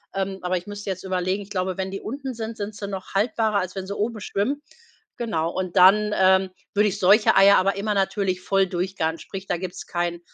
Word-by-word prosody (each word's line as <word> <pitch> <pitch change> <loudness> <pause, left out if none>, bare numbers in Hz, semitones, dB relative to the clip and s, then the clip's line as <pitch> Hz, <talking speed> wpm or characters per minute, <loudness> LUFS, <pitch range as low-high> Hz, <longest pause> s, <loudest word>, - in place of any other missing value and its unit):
Ähm, 195 0 -2
aber 180 +1 0
ich 175 - -7
müsste 205 0 -6
jetzt 185 0 -6
überlegen, 185 +1 -1
ich 200 - -16
glaube, 185 -2 -2
wenn 190 0 -3
die 195 - -4
unten 265 +2 -5
sind, 225 -1 -5
sind 205 +1 -4
sie 200 -1 -6
noch 190 -2 -7
haltbarer, 215 0 +1
als 185 0 -4
wenn 190 -1 -4
sie 200 - -4
oben 215 0 -2
schwimmen. 255 +10 -1 0.6
Genau. 165 -9 -1
Und 185 0 -3
dann, 210 +3 +6
ähm, 190 0 +4 0.2
würde 210 +1 +3
ich 200 - -5
solche 200 +2 +5
Eier 200 +1 +7
aber 195 +1 +1
immer 210 +1 -1
natürlich 195 -2 0
voll 195 +1 +2
durchgaren. 175 -2 -2
Sprich, 195 0 -8
da - - 0
gibt's 180 0 -7
kein 175 0 -2
195 Hz, 220 wpm, -24 LUFS, 185-205 Hz, 0.6 s, Eier